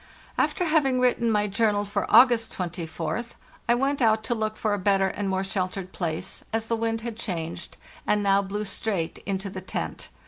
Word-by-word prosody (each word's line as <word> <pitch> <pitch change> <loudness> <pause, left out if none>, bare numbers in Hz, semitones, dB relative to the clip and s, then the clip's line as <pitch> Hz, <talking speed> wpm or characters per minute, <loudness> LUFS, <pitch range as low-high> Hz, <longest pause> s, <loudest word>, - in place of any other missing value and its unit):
After 360 - +1
having 290 -6 +3
written 245 -2 +2
my 210 -2 +2
journal 205 0 +1
for 205 - -2
August 240 -3 +6
24th 175 +5 -3 0.4
I 240 - +6
went 275 +2 0
out 220 -2 +4
to 240 - 0
look 215 -1 -2
for 215 -2 0
a 205 - 0
better 195 0 +3
and 200 0 -3
more 190 0 0
sheltered 185 -1 -3
place, 170 +1 -4
as 225 0 -1
the 230 - 0
wind 225 0 -1
had 235 -1 -5
changed, 170 -6 -5 0.3
and 210 0 +2
now 200 0 +4
blew 205 +2 -3
straight 195 -4 -2
into 195 0 -2
the 185 -1 -6
tent. 185 - -4
210 Hz, 185 wpm, -26 LUFS, 190-230 Hz, 0.4 s, August